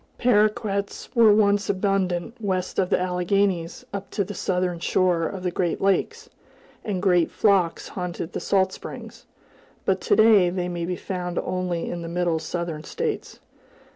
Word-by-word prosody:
Paroquets 210 Hz, -3 st, +1 dB
were 230 Hz, -4 st, +6 dB
once 205 Hz, -1 st, +3 dB
abundant 190 Hz, -1 st, 0 dB
west 185 Hz, -3 st, -1 dB
of 185 Hz, -2 st, +1 dB
the -, -, +2 dB
Alleghanies, 180 Hz, +2 st, 0 dB
up 200 Hz, -1 st, -5 dB
to 200 Hz, -, -1 dB
the 205 Hz, +2 st, -7 dB
southern 180 Hz, -2 st, -1 dB
shore 175 Hz, -1 st, +1 dB
of 190 Hz, -2 st, -6 dB
the 180 Hz, -, 0 dB
Great 175 Hz, -1 st, -1 dB
Lakes, 440 Hz, -, 0 dB, 0.6 s
and 195 Hz, -3 st, -3 dB
great 180 Hz, -4 st, +3 dB
flocks 195 Hz, -6 st, +1 dB
haunted 180 Hz, -3 st, -5 dB
the -, -, -2 dB
salt 190 Hz, -1 st, +1 dB
springs; -, -, -9 dB, 0.6 s
but 190 Hz, -1 st, +1 dB
to -, -, +2 dB
day 215 Hz, -5 st, +6 dB
they 180 Hz, 0 st, -2 dB
may 170 Hz, -1 st, -3 dB
be 180 Hz, +1 st, -2 dB
found 180 Hz, -1 st, -4 dB
only 180 Hz, -2 st, -2 dB
in 175 Hz, -, -4 dB
the 165 Hz, -, -6 dB
middle 170 Hz, -1 st, 0 dB
Southern 160 Hz, -1 st, -4 dB
states. 450 Hz, -, -4 dB
185 Hz, 160 wpm, -24 LUFS, 175-200 Hz, 0.6 s, were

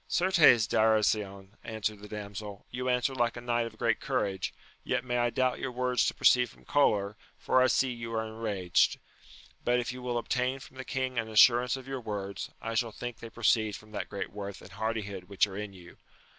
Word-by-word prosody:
Certes 170 Hz, -, +5 dB
Darasion, 105 Hz, -3 st, +1 dB
answered 110 Hz, -1 st, -3 dB
the 105 Hz, -, -10 dB
damsel, 105 Hz, -1 st, -7 dB
you 125 Hz, +1 st, -2 dB
answer 125 Hz, +2 st, +1 dB
like 120 Hz, -2 st, 0 dB
a -, -, -6 dB
knight 120 Hz, -1 st, 0 dB
of 110 Hz, -1 st, -12 dB
great 115 Hz, -1 st, +1 dB
courage, 100 Hz, -9 st, -1 dB, 0.3 s
yet 125 Hz, 0 st, -1 dB
may 125 Hz, -1 st, 0 dB
I 120 Hz, 0 st, +2 dB
doubt 130 Hz, +1 st, 0 dB
your 135 Hz, -, -3 dB
words 125 Hz, 0 st, +1 dB
to -, -, -1 dB
proceed 125 Hz, -1 st, +4 dB
from, -, -, -19 dB
choler, 105 Hz, -8 st, +2 dB, 0.2 s
for 130 Hz, -, +2 dB
I 130 Hz, -, +5 dB
see 130 Hz, +1 st, +2 dB
you 115 Hz, -1 st, -6 dB
are 110 Hz, 0 st, 0 dB
enraged; 110 Hz, -5 st, +1 dB, 0.7 s
but 125 Hz, 0 st, +2 dB
if 120 Hz, 0 st, -3 dB
you 125 Hz, -, -8 dB
will 125 Hz, -1 st, -2 dB
obtain 125 Hz, +2 st, 0 dB
from 130 Hz, 0 st, -14 dB
the 130 Hz, -, -6 dB
king 130 Hz, -2 st, -2 dB
an 110 Hz, 0 st, -3 dB
assurance 120 Hz, +4 st, +5 dB
of 130 Hz, 0 st, -11 dB
your 135 Hz, -1 st, -4 dB
words, 100 Hz, -3 st, -5 dB
I 115 Hz, -, -4 dB
shall 115 Hz, 0 st, 0 dB
think 120 Hz, +1 st, -6 dB
they 115 Hz, -, -8 dB
proceed 110 Hz, -2 st, +2 dB
from 110 Hz, 0 st, -13 dB
that 105 Hz, -, -4 dB
great 100 Hz, -3 st, -5 dB
worth 100 Hz, 0 st, -6 dB
and -, -, -13 dB
hardihood 105 Hz, -4 st, -3 dB
which 100 Hz, +1 st, +2 dB
are 100 Hz, -2 st, -9 dB
in 105 Hz, 0 st, -5 dB
you. 90 Hz, -2 st, -14 dB
115 Hz, 210 wpm, -30 LUFS, 105-125 Hz, 0.7 s, Certes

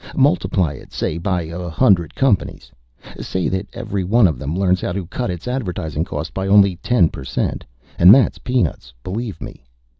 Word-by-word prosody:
Multiply 130 Hz, -, +2 dB
it, -, -, -13 dB
say, 80 Hz, -, -2 dB
by 90 Hz, -1 st, -1 dB
a 85 Hz, +2 st, -6 dB
hundred 85 Hz, -, +2 dB
companies. 130 Hz, -8 st, 0 dB, 0.5 s
Say 95 Hz, -1 st, -2 dB
that 95 Hz, +2 st, -3 dB
every 100 Hz, -1 st, -4 dB
one 110 Hz, +5 st, +4 dB
of 75 Hz, -8 st, -3 dB
them 75 Hz, +6 st, -3 dB
learns 95 Hz, -1 st, +1 dB
how -, -, -2 dB
to 95 Hz, -1 st, -4 dB
cut 120 Hz, +6 st, -4 dB
its 90 Hz, +4 st, -5 dB
advertising 90 Hz, -, -3 dB
cost 80 Hz, -, -5 dB
by 95 Hz, 0 st, -3 dB
only 100 Hz, -2 st, +5 dB
ten 95 Hz, -2 st, +2 dB
per 70 Hz, -, -9 dB
cent. -, -, -2 dB, 0.4 s
And 90 Hz, +2 st, +9 dB
that's 130 Hz, +4 st, +4 dB
peanuts, 120 Hz, -, -2 dB
believe 105 Hz, -1 st, -5 dB
me! -, -, -10 dB
95 Hz, 180 wpm, -19 LUFS, 85-105 Hz, 0.5 s, And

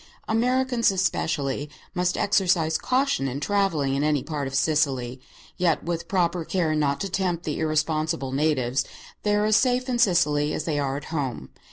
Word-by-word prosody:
Americans, 245 Hz, +1 st, +2 dB
especially, 145 Hz, -6 st, -1 dB, 0.2 s
must 180 Hz, -1 st, 0 dB
exercise 180 Hz, -5 st, +2 dB
caution 255 Hz, -, +1 dB
in 135 Hz, +1 st, -3 dB
travelling 165 Hz, -6 st, 0 dB
in 140 Hz, +1 st, 0 dB
any 150 Hz, -3 st, +1 dB
part 150 Hz, -4 st, -3 dB
of 135 Hz, -, -5 dB
Sicily; 135 Hz, -4 st, 0 dB, 0.4 s
yet 175 Hz, -4 st, +1 dB
with 170 Hz, 0 st, -3 dB
proper 175 Hz, -2 st, 0 dB
care 165 Hz, -2 st, 0 dB
not 145 Hz, -2 st, 0 dB
to 195 Hz, -, -1 dB
tempt 180 Hz, -2 st, -1 dB
the 150 Hz, -, -3 dB
irresponsible 155 Hz, -2 st, 0 dB
natives, 135 Hz, -3 st, +1 dB, 0.4 s
they 210 Hz, 0 st, +1 dB
are 210 Hz, 0 st, +2 dB
as 215 Hz, 0 st, +3 dB
safe 255 Hz, 0 st, +1 dB
in 245 Hz, -2 st, -1 dB
Sicily 150 Hz, -9 st, +2 dB
as -, -, -3 dB
they 155 Hz, -3 st, -1 dB
are 135 Hz, -1 st, -1 dB
at 145 Hz, -, -7 dB
home. 130 Hz, -, -3 dB
160 Hz, 170 wpm, -25 LUFS, 145-190 Hz, 0.4 s, as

